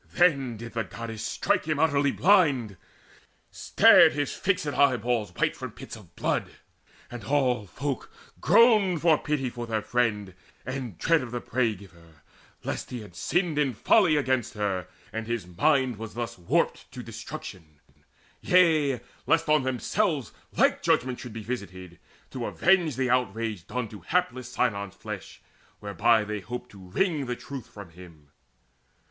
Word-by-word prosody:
Then 140 -9 +2
did 115 +1 -9
the 115 -1 -1
Goddess 115 -2 -7
strike - - 0
him 155 -2 -1
utterly 145 -2 +2
blind. 145 - +3 0.8
Stared - - +6
his 145 -1 -2
fixed 190 -5 0
eyeballs 125 -7 +1
white - - 0
from - - -7
pits - - -9
of - - -16
blood; - - -1 0.6
And 120 -1 -7
all 125 -7 +1
folk 140 +6 -4 0.3
groaned 210 -8 +4
for 160 -3 +5
pity 135 -5 -2
of 120 -1 -5
their 110 -2 -2
friend, 105 -6 -1 0.3
And 130 -7 -5
dread 165 -2 +2
of 125 - -6
the 120 +1 -4
Prey 115 -2 0
giver, 85 -6 -17 0.4
lest - - -4
he 125 -2 -6
had 105 -5 -13
sinned 175 - 0
In 135 -5 +1
folly 175 - +4
against 130 -6 0
her, 95 -4 -2 0.3
and 110 0 -4
his 115 -5 -2
mind 130 - +1
was 110 0 -8
thus 120 -1 -4
Warped 85 -1 -1
to - - -7
destruction 75 -5 -9 0.6
yea, 155 -8 +3 0.3
lest 165 0 +2
on 155 -1 +5
themselves 135 - -1 0.3
Like - - +3
judgment 125 -1 +1
should 125 - -8
be 110 -1 -7
visited, 95 -7 -7 0.3
to - - -4
avenge 175 -6 +2
The 130 -1 0
outrage 110 -6 -1
done 125 -2 -3
to 105 - -10
hapless 155 -9 -1
Sinon's 100 -6 -1
flesh, - - -8 0.4
Whereby 105 +2 +2
they 105 0 -4
hoped 125 +4 -7
to 100 - -14
wring 155 - 0
the 125 - -2
truth 135 0 -8
from 100 -5 -12
him. 80 -4 -15
125 Hz, 155 wpm, -27 LUFS, 105-145 Hz, 0.8 s, Stared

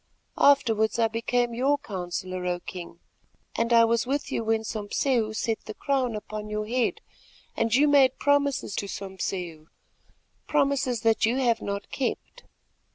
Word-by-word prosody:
Afterwards 230 -7 +4
I 230 -1 +3
became 235 +1 0
your 270 +5 +2
counsellor, 185 -6 -5
O 175 0 -1
King, 175 -1 -9 0.6
and 230 +1 0
I 230 -1 +7
was 230 +1 +1
with 280 +2 -2
you - - -1
when 220 0 0
Sompseu 220 +2 -1
set 225 0 -2
the 215 - -7
crown 260 -5 0
upon 210 0 -6
your 210 0 -2
head 240 +1 -1 0.5
and 230 - 0
you 290 +3 +5
made 275 -3 +5
promises 285 -6 +1
to 200 - -2
Sompseu—promises 195 - -4
that 225 -1 +3
you 235 - +1
have 240 -4 +1
not 200 0 -5
kept. 265 - -4
230 Hz, 145 wpm, -26 LUFS, 210-260 Hz, 0.6 s, I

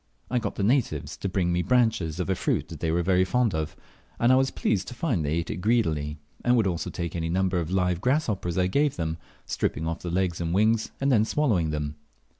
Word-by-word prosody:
I 125 - +2
got - - -4
the 100 - -2
natives 125 +4 +1
to 100 - -3
bring 90 -2 0
me 90 - +1
branches 95 -6 +1
of 90 - -1
a 95 - +2
fruit - - -1
they 80 - -3
were 85 +2 +1
very 95 0 +3
fond 115 +2 +1
of, 80 -1 -3 0.4
and 120 +2 +4
I - - +7
was 135 +1 +3
pleased 95 -3 -1
to 125 - -7
find 120 - 0
they 75 +1 -1
ate 85 0 -1
it - - -4
greedily, 80 -8 0 0.3
and 120 0 +4
would 110 - +3
also 85 -3 -1
take 85 -1 -4
any 80 -1 -2
number 95 +1 +1
of 85 -2 -3
live 90 -2 +1
grasshoppers 115 - 0
I 90 - +3
gave 140 +9 +1
them, 80 -1 -2 0.3
stripping 80 - -2
off 80 +1 -2
the 90 - -5
legs 90 -1 0
and 85 +1 -1
wings, 110 +2 +2
and 135 0 +2
then 110 -4 +5
swallowing 110 - +1
them. 75 -1 -3
95 Hz, 230 wpm, -26 LUFS, 85-115 Hz, 0.4 s, I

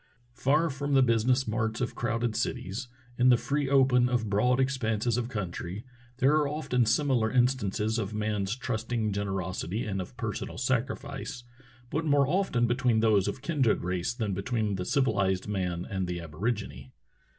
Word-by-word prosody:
Far 150 +6 +2
from 140 +1 -1
the 135 - +6
business 125 +2 +2
marts 110 0 -1
of 125 - -2
crowded 115 -1 -1
cities, 110 +1 -3 0.3
in 125 +1 +6
the 125 - +6
free 140 +2 -1
open 130 -3 +4
of 115 -4 -1
broad 125 +6 +3
expanses 120 -4 0
of 120 -1 -2
country, 95 -2 -5 0.3
there 130 +2 +4
are 150 -2 +2
often 135 -5 0
similar 120 -2 +2
instances 115 -3 +1
of 105 -2 -3
man's 105 -1 -1
trusting 115 -4 -2
generosity 95 0 -2
and 95 -3 -2
of 105 +7 -10
personal 115 -6 -4
self 125 +1 +2
sacrifice, 135 -1 -6 0.5
but 160 - 0
more 145 -2 +3
often 160 -8 +1
between 120 -1 +2
those 105 -4 +3
of 115 +6 -4
kindred 140 -9 +1
race 90 0 -1
than 110 -5 -2
between 105 +1 -1
the 90 -2 -3
civilized 100 -9 +1
man 90 -4 -2
and 95 -2 -2
the 90 0 -3
aborigine. 85 - -4
115 Hz, 160 wpm, -28 LUFS, 100-130 Hz, 0.5 s, the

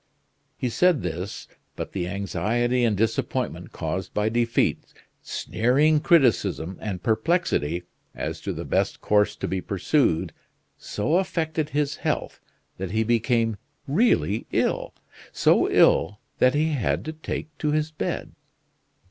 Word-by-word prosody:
He 125 - -1
said 180 +4 +3
this, 90 +3 -5 0.3
but - - -5
the 90 -3 -3
anxiety 105 +7 0
and 110 -4 +2
disappointment 110 +1 -1
caused 90 +4 -4
by 105 +1 +2
defeat, 115 0 +1 0.4
sneering 145 +7 +2
criticism, 120 - +2
and 95 -4 -4
perplexity, 110 - +1 0.3
as - - -4
to - - -3
the - - -5
best - - 0
course 105 0 +2
to - - -4
be 95 -1 -2
pursued, 100 - +1 0.4
so 150 +12 -1
affected 160 -5 -1
his 145 -1 -1
health - - -2 0.4
that 95 -1 -3
he 110 +4 +1
became 115 -1 +1 0.3
really 140 - +2
ill - - 0 0.4
so - - +3
ill 100 +5 +4 0.2
that 130 +1 +4
he 155 +2 +2
had 140 -8 -1
to 155 - -4
take 155 0 -6
to 150 - 0
his 155 +1 0
bed. 155 - -3
115 Hz, 130 wpm, -25 LUFS, 100-150 Hz, 0.4 s, ill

